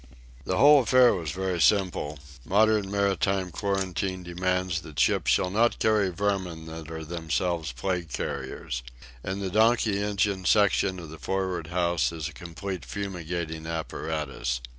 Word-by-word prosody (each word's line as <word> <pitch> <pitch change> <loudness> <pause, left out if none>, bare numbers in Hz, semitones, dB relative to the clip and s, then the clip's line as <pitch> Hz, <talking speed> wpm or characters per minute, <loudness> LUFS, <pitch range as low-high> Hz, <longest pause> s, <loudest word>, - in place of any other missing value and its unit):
The 95 - -1
whole 145 +3 +8
affair 125 0 +5
was 85 -6 -3
very 90 +2 -2
simple. 90 -7 +2 0.3
Modern 105 +3 +3
maritime 100 -2 0
quarantine 95 -1 -2
demands 90 0 -1
that 80 -3 -8
ships - - +2
shall 90 - +2
not 115 +4 +2
carry 105 -3 +2
vermin 90 -3 -2
that 80 -1 -8
are 80 -1 -6
themselves 85 -1 -2
plague 85 +6 -3
carriers. - - -4 0.4
In 95 +1 -3
the 95 -2 -3
donkey 110 -1 +3
engine 100 -2 0
section 100 -2 +3
of 80 -3 -9
the 80 - -10
for'ard 95 -4 -2
house 85 -1 +1
is 80 -3 -4
a 80 - -9
complete 90 +3 -6
fumigating 85 -5 -4
apparatus. 75 -6 -3
90 Hz, 140 wpm, -27 LUFS, 80-100 Hz, 0.4 s, whole